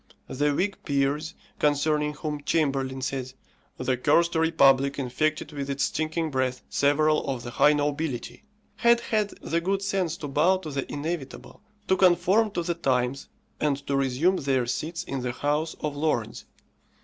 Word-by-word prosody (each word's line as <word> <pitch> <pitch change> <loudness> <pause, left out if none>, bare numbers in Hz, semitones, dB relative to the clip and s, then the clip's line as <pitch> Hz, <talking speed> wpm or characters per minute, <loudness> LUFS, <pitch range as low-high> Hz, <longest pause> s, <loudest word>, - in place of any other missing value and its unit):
The 145 +2 0
Whig 190 +7 -1
peers, 145 +3 -1 0.2
concerning 150 0 +1
whom 150 0 -4
Chamberlain 135 -4 0
says, 130 -1 -4 0.4
"The 130 0 0
cursed 165 +6 +3
republic 140 -4 +3
infected 145 +4 -1
with 140 -2 -5
its 140 0 -1
stinking 160 0 -1
breath 130 -1 -1
several 150 +2 +2
of 130 -3 -3
the 120 - -6
high 150 +4 +5
nobility," 145 - -2 0.3
had 235 0 +4
had 215 -3 0
the 170 +1 0
good 195 +3 -1
sense 190 -4 -1
to 150 - -6
bow 160 +7 +3
to 160 -5 -7
the 140 -1 -4
inevitable, 150 -1 -5 0.3
to 190 - +4
conform 190 +4 +4
to 175 - -1
the 170 0 -1
times, 130 -4 -1 0.3
and 145 -2 +1
to 140 - -1
resume 135 +8 +2
their 135 -4 0
seats 160 +8 -3
in 135 -6 -4
the 125 -1 -3
House 150 +4 -1
of 150 -1 -2
Lords. 130 -7 -2
150 Hz, 160 wpm, -26 LUFS, 135-165 Hz, 0.4 s, high